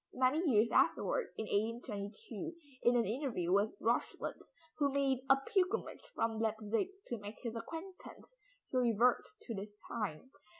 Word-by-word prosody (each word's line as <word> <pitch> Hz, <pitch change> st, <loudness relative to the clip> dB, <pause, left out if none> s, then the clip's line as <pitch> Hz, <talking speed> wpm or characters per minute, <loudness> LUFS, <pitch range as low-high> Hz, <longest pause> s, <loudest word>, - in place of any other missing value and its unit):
Many 285 Hz, +6 st, +3 dB
years 225 Hz, -1 st, +4 dB
afterward, 485 Hz, -, +3 dB
in 220 Hz, -, -2 dB
1822, 215 Hz, +5 st, -3 dB, 0.3 s
in 240 Hz, +1 st, +4 dB
an 235 Hz, -, +3 dB
interview 225 Hz, -, -1 dB
with 205 Hz, -, +3 dB
Rochlitz -, -, -1 dB, 0.3 s
who 285 Hz, -1 st, +3 dB
made 270 Hz, -2 st, +2 dB
a 270 Hz, -, +9 dB
pilgrimage 380 Hz, +9 st, 0 dB
from 225 Hz, -1 st, 0 dB
Leipzig 220 Hz, -, 0 dB, 0.2 s
to 240 Hz, -, -4 dB
make 205 Hz, +1 st, -8 dB
his 235 Hz, -2 st, -3 dB
acquaintance, 355 Hz, -, -8 dB, 0.4 s
he 255 Hz, -, +1 dB
reverts 245 Hz, -, +3 dB
to 235 Hz, -, -4 dB
this 205 Hz, +1 st, -7 dB
time. 210 Hz, +1 st, -3 dB
235 Hz, 140 wpm, -35 LUFS, 215-275 Hz, 0.4 s, a